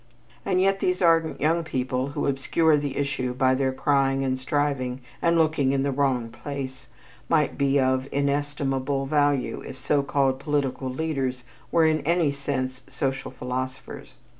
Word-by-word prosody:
And 185 -2 +1
yet 195 +1 +2
these 180 -1 0
ardent 165 -2 +3
young 165 +3 +2
people 130 -3 -2
who 140 - -3
obscure 150 +3 +2
the 145 -2 -2
issue 130 -3 -1
by 130 0 +3
their 130 0 +1
crying 135 0 +1
and 130 -1 -1
striving 130 -2 -1 0.2
and 170 0 +3
looking 155 -4 +2
in 135 -1 +1
the 140 - 0
wrong 130 -4 0
place, 130 +2 -7 0.4
might 155 -3 +2
be 140 0 +2
of 130 0 +1
inestimable 140 -1 -1
value 145 -2 +1
if - - -8
so 145 +2 +2
called 135 -1 +1
political 140 -2 -1
leaders 130 -3 -2 0.3
were 165 -1 +4
in 155 -1 +2
any 165 -2 +2
sense 130 -2 -3
social 135 -1 -3
philosophers. 130 +1 -6
140 Hz, 155 wpm, -25 LUFS, 130-150 Hz, 0.4 s, were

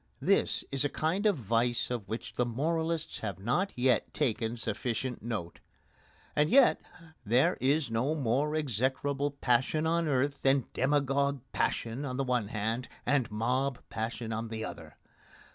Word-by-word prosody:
This - - +2
is 135 0 +1
a 145 - +1
kind 180 +10 0
of 200 -5 +2
vice 120 +1 0
of 115 -5 -3
which 110 +3 -5
the 125 - +1
moralists 160 +6 -1
have 100 -5 -4
not 125 - 0
yet 125 0 +1
taken 115 0 0
sufficient 125 +2 -2
note. 105 -7 -4 0.8
And 150 +1 +3
yet 265 +1 +6 0.4
there 120 +4 +3
is 140 0 +2
no 125 +7 +1
more 145 +2 +1
execrable 140 +1 0
passion 135 +3 +1
on 165 0 +1
earth 140 0 +1
than 135 -1 +3
demagogue 140 0 +1
passion 115 +4 -1
on 130 -3 -3
the 135 - +1
one 125 -5 0
hand, 110 +3 -2 0.2
and 130 -3 +2
mob 125 +5 0
passion 115 +1 -3
on 115 +1 -3
the 110 -1 -4
other. 80 -3 -9
130 Hz, 150 wpm, -30 LUFS, 115-145 Hz, 0.8 s, yet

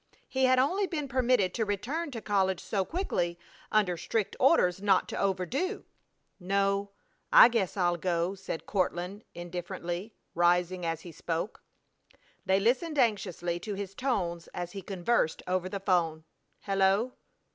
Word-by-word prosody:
He 265 0 +1
had 255 0 +4
only 370 +10 +2
been 300 -5 -3
permitted 245 -7 +2
to 225 - 0
return 235 - -2
to 235 -5 -6
college 190 -4 +1
so 195 -3 -1
quickly 180 - -2 0.3
under 200 -5 +2
strict 200 +5 -2
orders 195 - +4
not 195 -2 +3
to - - -4
overdo. 200 - -1 0.5
"No, 200 +2 0 0.4
I - - +10
guess 215 -6 -1
I'll 175 -2 +2
go," 175 +1 0
said 190 -4 -6
Courtland, 185 +1 -2
indifferently, 175 +3 -5 0.2
rising 175 +1 +2
as 165 -1 -2
he 175 - -10
spoke. 165 +5 -4 0.9
They 190 +1 +4
listened 265 - +1
anxiously 185 - 0
to 205 +2 -5
his 195 -1 -5
tones 185 -9 -2
as 175 -1 -4
he 195 - -6
conversed 190 -1 0
over 185 0 0
the 200 - -4
'phone. 170 -5 +1 0.4
"Hello!... 195 +5 +2
195 Hz, 145 wpm, -29 LUFS, 175-230 Hz, 0.9 s, I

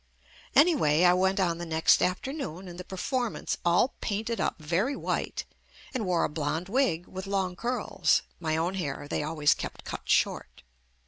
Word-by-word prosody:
Anyway, 270 - +5
I 180 0 +7
went 190 +2 +2
on 170 -3 +1
the 175 - -4
next 160 0 +4
afternoon 190 - -2
in 175 -1 -9
the 180 - -6
performance 235 +6 -2
all 175 +9 +3
painted 220 +2 -2
up - - -1
very 180 - 0
white - - -2 0.5
and 235 -7 -2
wore 175 -2 +2
a - - +2
blonde 160 +4 -3
wig 190 -9 +1
with 190 +1 -7
long 190 -2 -1
curls 245 +6 +1 0.2
(my 160 -2 -1
own 170 +3 0
hair 145 -6 -4
they - - -1
always 150 -1 +2
kept - - -7
cut - - -7
short) - - +1
180 Hz, 170 wpm, -28 LUFS, 165-215 Hz, 0.5 s, I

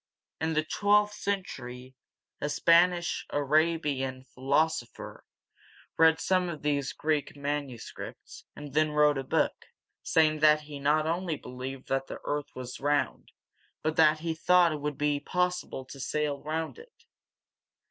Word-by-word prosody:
In 160 0 -1
the 155 0 +1
twelfth 210 +5 +2
century 130 -12 -5 0.5
a 145 - -1
Spanish 170 +3 +3
A - - -7
ra´bi 150 0 +2
an 130 -1 -4
philosopher 135 +1 -2 0.7
read 160 -1 +5
some 185 0 +1
of 155 -4 -7
these 145 -2 0
Greek 150 -2 -1
manuscripts, 140 -4 -6
and 145 -2 -9
then 155 0 +2
wrote 150 -1 +4
a - - -3
book, - - -1 0.3
saying 155 -1 +2
that 150 0 +5
he 150 -1 -9
not 150 +2 +2
only 170 0 -1
believed 130 0 -8
that 135 0 0
the - - -6
earth 145 -1 -2
is 125 -1 -7
round, 145 +1 -1 0.5
but 155 0 0
that 155 -1 +5
he 165 0 -1
thought 175 +1 +4
it 150 -2 -4
would 150 -1 -3
be 145 -1 +1
possible 180 -4 -2
to 135 +1 -11
sail 145 0 -2
around 160 - -3
it! 465 0 -17
150 Hz, 145 wpm, -29 LUFS, 140-160 Hz, 0.7 s, read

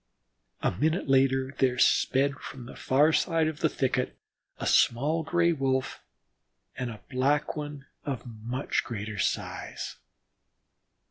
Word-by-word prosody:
A - - +3
minute 155 - 0
later 135 0 +3
there 125 -2 +3
sped 135 +2 +3
from 125 -2 -8
the - - -10
far 145 +4 +3
side 165 -2 +2
of 155 -1 -4
the 160 - +2
thicket 125 -2 -1 0.4
a - - -5
small 145 +7 +3
Gray 170 +1 +2
wolf 130 -3 -1 0.7
and 125 - -3
a 110 -2 -9
Black 140 +5 +1
One 145 -2 -6 0.2
of 135 -5 -3
very 120 -3 -10
much 125 +5 -1
greater 110 -3 -5
size. - - -3
135 Hz, 135 wpm, -28 LUFS, 125-150 Hz, 0.7 s, A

